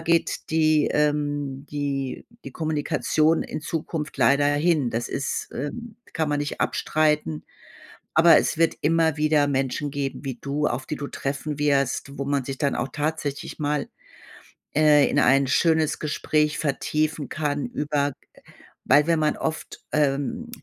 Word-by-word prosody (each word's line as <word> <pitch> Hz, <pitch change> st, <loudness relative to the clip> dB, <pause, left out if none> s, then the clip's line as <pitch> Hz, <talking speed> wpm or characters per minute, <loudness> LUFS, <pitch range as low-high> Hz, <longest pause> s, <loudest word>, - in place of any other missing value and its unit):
geht 165 Hz, 0 st, 0 dB
die, 155 Hz, -1 st, +3 dB
ähm 145 Hz, -2 st, -1 dB
die 140 Hz, -2 st, -3 dB, 0.2 s
die -, -, -7 dB
Kommunikation 155 Hz, 0 st, +1 dB
in -, -, -6 dB
Zukunft 155 Hz, -1 st, -4 dB
leider 140 Hz, +1 st, +4 dB
hin. 145 Hz, -1 st, +2 dB
Das 115 Hz, +1 st, -2 dB
ist 135 Hz, -, -3 dB
ähm, 225 Hz, -, -6 dB, 0.2 s
kann 160 Hz, -3 st, 0 dB
man 145 Hz, -, 0 dB
nicht 145 Hz, -, -4 dB
abstreiten, 150 Hz, -, 0 dB, 0.7 s
aber 165 Hz, +1 st, +7 dB
es -, -, -1 dB
wird 165 Hz, 0 st, +3 dB
immer 160 Hz, 0 st, +2 dB
wieder 150 Hz, -1 st, +3 dB
Menschen 135 Hz, +1 st, -1 dB
geben 140 Hz, 0 st, -4 dB
wie 135 Hz, -3 st, -4 dB
du, 145 Hz, +2 st, -1 dB
auf 130 Hz, 0 st, -2 dB
die 150 Hz, -, -3 dB
du 145 Hz, -, -5 dB
treffen 140 Hz, +2 st, -4 dB
wirst, 140 Hz, -1 st, 0 dB
wo 140 Hz, -, -2 dB
man 140 Hz, 0 st, 0 dB
sich 135 Hz, +1 st, -5 dB
dann 140 Hz, -2 st, +1 dB
auch 130 Hz, -, -2 dB
tatsächlich 150 Hz, -2 st, -3 dB
mal, 145 Hz, -1 st, -1 dB, 0.9 s
äh, 150 Hz, -1 st, +5 dB
in 145 Hz, -, +2 dB
ein 135 Hz, 0 st, +4 dB
schönes 160 Hz, +3 st, +2 dB
Gespräch 150 Hz, 0 st, 0 dB
vertiefen 155 Hz, +1 st, -1 dB
kann 145 Hz, -2 st, -2 dB
über 145 Hz, -1 st, -1 dB
g -, -, -31 dB, 0.6 s
weil 145 Hz, +1 st, +5 dB
wenn 165 Hz, -1 st, +2 dB
man 155 Hz, -1 st, +1 dB
oft, 160 Hz, 0 st, -5 dB
ähm 150 Hz, +12 st, 0 dB
150 Hz, 150 wpm, -24 LUFS, 140-155 Hz, 0.9 s, aber